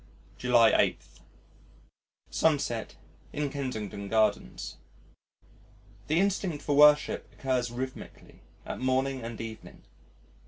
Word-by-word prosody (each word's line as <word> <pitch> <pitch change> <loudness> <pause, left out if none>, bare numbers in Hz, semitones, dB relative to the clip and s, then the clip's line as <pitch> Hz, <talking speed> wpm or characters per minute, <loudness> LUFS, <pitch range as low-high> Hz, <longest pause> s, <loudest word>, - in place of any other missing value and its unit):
July 120 -3 +4
8. - - +2 1.3
Sunset 140 -8 0 0.4
in 145 -1 -2
Kensington 110 -8 -4
Gardens 110 -1 0 1.3
The 160 +3 +2
instinct 190 -5 0
for 145 - 0
worship 150 0 +5
occurs 130 -2 -1
rhythmically 130 +2 -8 0.2
at - - -5
morning 130 +1 0
and 115 0 -7
evening. 115 -1 -9
130 Hz, 90 wpm, -29 LUFS, 115-145 Hz, 1.3 s, worship